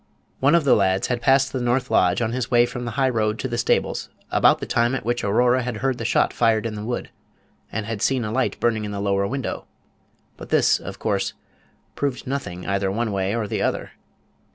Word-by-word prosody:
One 140 +5 +4
of 170 - +3
the 140 - +5
lads 95 -1 +1
had 120 -1 -1
passed 135 +1 +3
the 130 - -2
north 125 +1 0
lodge 90 +6 +3
on 110 - -1
his 125 -1 -2
way 120 -1 +5
from 120 0 -6
the 120 - -3
high 135 -1 +3
road 110 -3 0
to 130 - -3
the 120 - -3
stables 115 - 0 0.2
about - - +5
the - - -5
time 120 +2 +1
at 130 - -5
which 120 +1 -1
Aurora 120 +5 +3
had 125 -3 -4
heard 130 +2 -1
the 115 - -4
shot 120 - +2
fired 115 -2 +2
in 115 - -2
the 105 0 -6
wood, 120 +2 -4 0.6
and 110 0 -3
had 110 -2 -4
seen 130 -4 +1
a 105 - -3
light 130 +3 -1
burning 115 -2 +1
in 105 - -4
the 100 - -4
lower 100 0 +1
window; 135 +1 -4 0.7
but - - -10
this, - - +3
of - - -8
course, - - -1 0.6
proved 140 -3 -3
nothing 110 -10 -4
either 100 -1 0
one 110 +3 -1
way 100 +1 -1
or 115 -3 -2
the - - -2
other. - - -1
120 Hz, 225 wpm, -23 LUFS, 105-125 Hz, 0.7 s, the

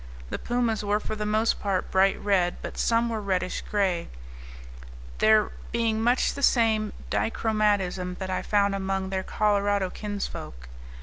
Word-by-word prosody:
The - - -3
pumas 240 -3 -1
were 205 +1 +1
for 215 - -5
the 210 0 -3
most 215 +2 +1
part 195 -2 -1
bright 195 +1 +3
red, 185 -4 +1
but - - -6
some 230 0 +2
were 225 -2 -2
reddish 185 -2 -1
gray, 190 -5 -1 1.1
there 215 -1 +4 0.2
being 225 -1 0
much 245 +3 +2
the 280 - -6
same 220 -5 +3 0.2
dichromatism 205 -5 0
that 190 -1 -4
I 185 - -1
found 200 -1 +2
among 195 -1 -2
their 190 -1 -1
Colorado 205 -2 +1
kinsfolk. 195 - -6
205 Hz, 145 wpm, -26 LUFS, 190-220 Hz, 1.1 s, there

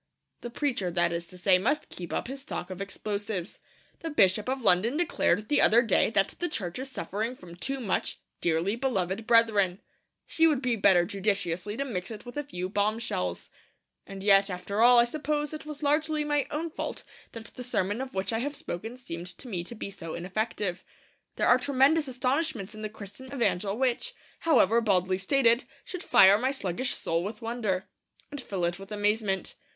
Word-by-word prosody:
The 240 - -6
preacher, 240 -7 -1
that 175 0 +2
is 170 0 -4
to 180 - -13
say, 185 0 +4
must 265 +10 0
keep 175 -1 -7
up - - -2
his 270 +2 -6
stock 190 -8 -6
of 185 +1 -6
explosives. 200 -1 -4 0.4
The 330 - -4
Bishop 210 -5 +3
of 260 -1 -2
London 220 +8 +4
declared 215 - +1
the 290 - +3
other 235 +3 +6
day 220 - +3
that 195 -3 +2
the 350 - +1
Church 185 - -3
is 265 +1 -5
suffering 225 -1 -3
from 170 -7 -12
too 270 +9 -3
much 210 -7 -2 0.2
'dearly 170 +5 +1
beloved 220 -5 -1
brethren.' 210 -6 +4 0.5
She 325 0 +3
would 300 -5 +2
be 250 -3 0
better 190 -4 +4
judiciously 195 0 -1
to 275 - -1
mix 190 -8 -4
it 220 0 -9
with 245 - -9
a 290 - -1
few 185 -11 -5
bombshells. 205 - -2 0.6
And 195 0 -8
yet, 195 0 +5
after 195 +3 -3
all, 245 +1 +7
I 235 - +8
suppose 295 +3 -2
it 310 0 -7
was 300 0 -7
largely 305 +1 +1
my 295 -2 0
own 320 +2 -3
fault - - -5 0.3
that 230 -1 -8
the - - -8
sermon 210 -2 -1
of 265 -4 -7
which 190 +2 -1
I 225 - 0
have 285 +4 -3
spoken 225 +8 -6
seemed 175 -8 -7
to 260 - -12
me 180 -7 -3
to 235 - -8
be 200 - -6
so 165 -4 -7
ineffective. 195 +1 -3 0.5
There - - 0
are 245 - +6
tremendous 285 +3 +3
astonishments 255 - -1
in 215 - -9
the 215 - -3
Christian 215 +5 -11
evangel 210 -6 0
which, 265 - -1 0.2
however 235 - +4
baldly 185 -3 +2
stated, 235 +3 +3 0.2
should 365 - -6
fire 205 - +6
my 255 +3 +1
sluggish 255 -1 -2
soul 165 +1 -1
with 210 +3 -6
wonder, 220 -5 -2 0.4
and 285 -1 -6
fill 190 -7 -2
it 175 +2 -2
with 195 +2 -11
amazement. 210 -1 0
220 Hz, 190 wpm, -28 LUFS, 190-260 Hz, 0.6 s, I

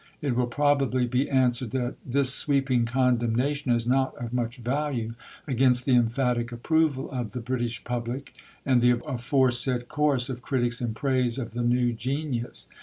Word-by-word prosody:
It 140 -5 -1
will 125 0 +1
probably 135 -1 +2
be 125 +3 0
answered 125 -2 +1
that 125 0 -2
this 135 +1 +2
sweeping 135 -4 +1
condemnation 125 +2 +1
is 120 -1 +1
not 130 +2 +1
of 120 -1 -6
much 120 0 -2
value 125 -2 -2 0.3
against 125 -2 +2
the 130 - +3
emphatic 120 0 +1
approval 145 +3 0
of 120 -6 -4
the 125 - -3
British 120 -1 -3
public 120 +3 -4 0.3
and 130 -3 +3
the 125 0 +4
aforesaid 125 -2 +1
chorus 145 -5 +1
of 125 -2 -5
critics 120 -2 -1
in 115 -3 -2
praise 130 -1 0
of 120 -4 -4
the 120 +2 -3
new 120 0 +2
Genius.... 125 +1 -4
125 Hz, 160 wpm, -26 LUFS, 120-135 Hz, 0.3 s, the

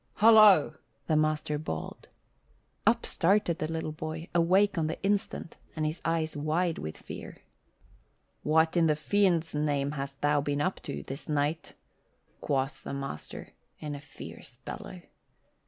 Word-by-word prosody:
"Hollo!" 215 -7 +7 0.3
the 155 - +1
master 155 -1 +1
bawled. 80 - -6 0.8
Up 235 +1 +4
started 175 -2 +2
the 155 +1 -2
little 160 -1 -3
boy, 155 +2 -6
awake 185 +4 +4
on 160 -2 0
the 160 - -4
instant 200 -4 -1 0.2
and 155 -1 -1
his 155 +2 -3
eyes 165 -1 0
wide 160 +3 0
with 80 0 -6
fear. - - -9 1.0
"What 160 +2 +3
in 170 -2 +4
the 155 - +3
fiend's 170 0 +1
name 145 -2 0
hast 140 -1 -5
thou 145 0 +3
been 145 0 -1
up 185 +6 -1
to, 140 - -5
this 135 +4 -8
night?" 150 +2 -1 0.7
quoth 135 +1 -1
the - - -5
master 135 - -6 0.3
in 150 -1 -5
a 140 - -7
fierce 145 - -11
bellow. - - -7
155 Hz, 145 wpm, -29 LUFS, 145-170 Hz, 1.0 s, Hollo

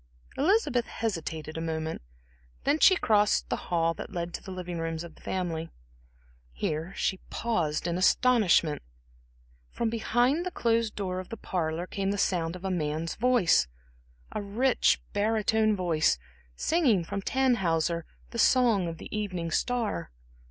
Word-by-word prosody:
Elizabeth 290 - +2
hesitated 160 -7 -4
a - - -4
moment, 160 -1 -3 0.6
then 290 +3 +2
she 375 - +7
crossed 210 - +2
the - - +1
hall 165 -1 +2
that 210 - -8
led 170 -2 -4
to - - -5
the - - -11
living 180 -2 -5
rooms 165 0 -3
of 170 -2 -10
the - - -20
family. 165 -3 -3 0.8
Here 155 - -2
she 190 - -1
paused 170 -11 -1
in 175 +1 -1
astonishment. 190 -7 +3 0.9
From 230 -1 -2
behind 240 +7 +1
the 365 - -2
closed 230 -7 0
door 185 -2 -3
of 185 - -8
the 230 - -6
parlor 170 -3 -2
came 195 +1 -2
the 205 - -1
sound 170 -3 0
of 180 +1 -8
a 190 - 0
man's 160 -1 -2
voice; 235 - +3 0.6
a 215 - -3
rich, 235 +6 +2
barytone 215 +1 +2
voice 165 - +2 0.4
singing 255 - +2
from 200 +4 -4
Tannhäuser 180 -10 +1 0.3
the 235 - -5
song 230 -8 +4
of 165 -1 -5
the - - -8
Evening 185 -6 -3
Star. 235 - -1
190 Hz, 150 wpm, -28 LUFS, 165-230 Hz, 0.9 s, she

